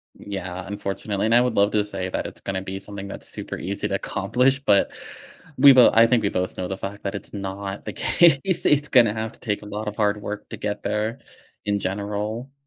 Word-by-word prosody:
Yeah, 90 -2 -6
unfortunately, 100 +1 -3
and 115 - +3
I 120 - +7
would 125 -2 0
love 100 +1 +4
to 105 - +3
say 95 -3 -4
that - - -2
it's - - -10
gonna 95 -1 -3
be 95 0 -5
something 100 0 -8
that's - - -8
super - - -6
easy - - -3
to - - -2
accomplish, 130 +2 +1
but 105 -7 +3 0.7
we 140 +1 +9
both 125 -2 +7
I 115 +1 +7
think 115 -1 +2
we 100 - +2
both 90 -1 -2
know 90 - -2
the 95 - -3
fact 100 +2 -7
that 100 - -2
it's 100 - -7
not 100 0 -5
the - - -5
case. 170 +2 +3
It's 150 0 +3
gonna 115 -6 +5
have 110 0 -4
to - - -22
take 105 -3 -2
a - - -10
lot 105 +1 -4
of 105 - -6
hard 105 -1 +1
work 105 0 -6
to - - -5
get 105 0 -3
there 105 +4 -2 0.4
in 105 -1 0
general. 105 +6 -3
105 Hz, 225 wpm, -23 LUFS, 100-115 Hz, 0.7 s, we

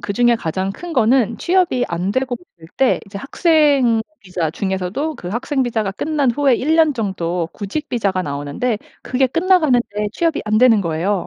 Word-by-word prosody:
그중에 235 +3 +2
가장 190 +1 -3
큰 345 - -8
거는 235 -1 +3
취업이 350 -9 +1
안 175 +3 -2
되고 260 0 -1 0.2
있을 160 - -14
때 265 -2 +3
이제 200 -1 -8
학생 280 - +3 0.2
비자 180 -4 -3
중에서도 190 - -3
그 175 - -7
학생 260 +6 -1
비자가 220 -5 -1
끝난 285 +5 0
후에 275 +1 +2
1 300 +7 0
년 315 -3 +4
정도 180 -6 -2
구직 255 +10 -5
비자가 195 -6 0
나오는데 145 - -2 0.2
그게 260 +1 +1
끝나가는데 260 - +1
취업이 330 -1 0
안 215 - +1
되는 235 -4 +5
거예요. 170 +4 -1
235 Hz, 345 characters per minute, -19 LUFS, 190-275 Hz, 0.2 s, 되는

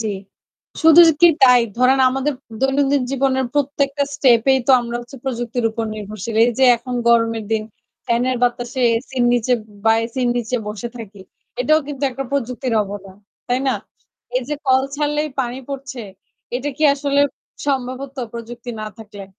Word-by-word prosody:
জি। 220 - -2 0.7
শুধুই 325 +2 +8 0.2
কি 345 - +8
তাই? 250 -2 +7 0.2
ধরেন 255 +2 +4
আমাদের 270 +3 -1 0.3
দৈনন্দিন 270 +1 +2
জীবনের 265 -1 +1
প্রত্যেকটা 285 0 0
স্টেপেই 265 0 +4
তো - - +4
আমরা 235 0 -4
হচ্ছে 240 +3 -12
প্রযুক্তির 240 -2 -3
উপর 225 +1 -3
নির্ভরশীল। 215 +1 -6
এইযে 245 +2 +2
এখন 245 +2 -7
গরমের 230 -1 +2
দিন। 220 -1 +1 0.4
ফ্যানের 245 +2 +1
বাতাসে, 245 +1 -1 0.2
এসির 255 0 -2
নিচে, 245 +1 +1 0.3
বা 225 - +5
এসির 245 +2 -2
নিচে 240 +1 -1
বসে 215 +3 -5
থাকি। 210 -4 -10 0.4
এটাও 310 +5 +3
কিন্তু 290 -1 -7
একটা 270 +2 -5
প্রযুক্তির 255 -2 -2
অবদান। 195 -1 -9 0.3
তাই 250 +1 +1
না? - - +1 0.6
এই 255 - 0
যে 300 - -1
কল 260 0 +4
ছাড়লেই 295 +1 -1
পানি 245 0 -3
পড়ছে, 275 -2 -6 0.6
এটা 270 +3 -3
কি 310 - -4
আসলে 280 0 0 0.5
সম্ভব 260 -2 -1
হতো 275 -1 -8
প্রযুক্তি 235 +1 -7
না 215 - -5
থাকলে? 205 -2 -10
255 Hz, 155 wpm, -19 LUFS, 235-275 Hz, 0.7 s, শুধুই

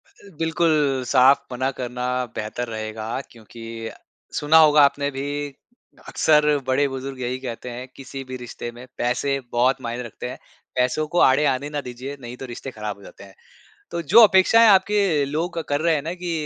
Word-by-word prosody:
अ, 200 - -17
बिल्कुल, 155 -5 +1
साफ़ 135 +1 +5
मना 130 +2 -1
करना 125 0 -4 0.3
बेहतर 110 +3 -4
रहेगा 110 0 -5 0.2
क्योंकि 115 0 -13 0.8
सुना 150 +2 +4
होगा 150 0 +5
आपने 140 0 -3
भी 135 0 -5 0.8
अक्सर 150 -1 +3 0.2
बड़े-बुजुर्ग 135 0 -1
यही 125 +1 -2
कहते 125 0 -6
हैं 125 +2 -7
किसी 135 0 -8
भी 130 - -5
रिश्ते 120 -1 -7
में 120 +2 -12
पैसे 125 +3 0
बहुत 130 +2 +2
मायने 120 +1 -4
रखते 120 +2 -7
हैं। - - -7 0.4
पैसों 130 +5 +1
को 175 - +3
आड़े 135 +3 +3
आने 140 +3 -4
ना 145 - -1
दीजिए 130 +3 -7
नहीं 120 +1 -8
तो - - -4
रिश्ते 125 +2 -7
ख़राब 105 -2 -6
हो 100 - -17
जाते 100 - -13
हैं। 95 -2 -15 0.6
तो 170 - -3
जो 235 - +10
अपेक्षाएँ 215 +4 +6
आपके 200 +1 +4 0.3
लोग 165 +5 -3
कर 145 +1 0
रहे 165 0 +2
हैं 145 - -1
ना 165 +2 -4
कि 175 -1 -2
130 Hz, 180 wpm, -22 LUFS, 120-150 Hz, 0.8 s, जो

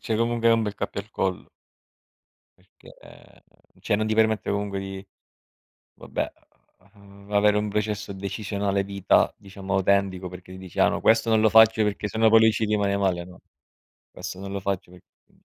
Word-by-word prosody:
cioè 110 - -1
comunque 115 0 0
hai 115 - +6
un 115 - 0
bel 105 -1 -4
cappio 100 - -4
al 105 - -24
collo 95 -4 -3 1.1
perché - - -19 0.9
cioè 105 - 0
non 110 +1 -1
ti 110 - 0
permette 110 -2 +1
comunque 100 -1 -2
di 95 0 -7 0.9
vabbè, - - -4 0.6
uhm, 100 0 -16
avere 105 0 +4
un 105 0 -1
processo 105 -1 -2
decisionale 100 0 -2
vita 100 -1 +2
diciamo 95 -1 -8
autentico 95 -1 +1
perché 90 +1 -11
dici: 95 -2 -11
"Ah - - +5
no - - -2
questo 115 0 +3
non 110 -1 +4
lo 110 - +5
faccio 110 0 +6
perché 105 0 -2
se 110 - -5
no 110 0 +5
poi 110 0 +6
lui 110 0 +6
ci 110 0 -1
rimane 100 -2 0
male, 90 -3 0
no, 90 0 -15 0.7
questo 90 - -8
non 100 0 -7
lo 100 - -3
faccio 95 -2 -3
per", 90 - -15 0.3
uhm. - - -29
100 Hz, 180 wpm, -24 LUFS, 95-110 Hz, 1.1 s, hai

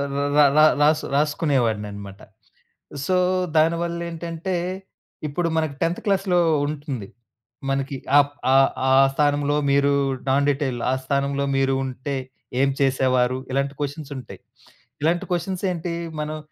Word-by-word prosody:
ర - - -1 0.2
ర - - +8 0.2
ర - - +7 0.2
రాసు 150 +1 +3
రాసుకునేవాడిననమాట. 110 - -1 0.9
సో, 185 - +1 0.4
దానివల్లేంటంటే 170 +2 -1 0.7
ఇప్పుడు 165 +4 -1
మనకి 155 -3 -1
10థ్ 165 +1 0
క్లాస్‌‌లో 195 -3 +2 0.3
ఉంటుంది. 140 -8 -5 0.6
మనకి 135 0 -1 0.2
ఆప్ 145 0 +2 0.2
ఆహ్, - - +5
ఆహ్, 135 0 +5 0.2
ఆ - - +4 0.2
స్థానంలో 145 0 +1 0.2
మీరు 140 0 +3 0.4
నాన్ 140 +2 +2
డీటెయిల్ 135 -3 -1
ఆ - - +2
స్థానంలో 140 +1 0
మీరు 135 0 +2
ఉంటే 130 +2 -4 0.5
ఏం 135 - +3
చేసేవారు? 130 -2 +2
ఇలాంటి 140 +1 0
కొషన్సుంటాయి. 145 -3 -6 0.6
ఇలాంటి 165 +3 +1
కొషన్సేంటి 180 -1 -2 0.3
మనం 155 +1 -4
145 Hz, 115 wpm, -23 LUFS, 135-165 Hz, 0.9 s, ర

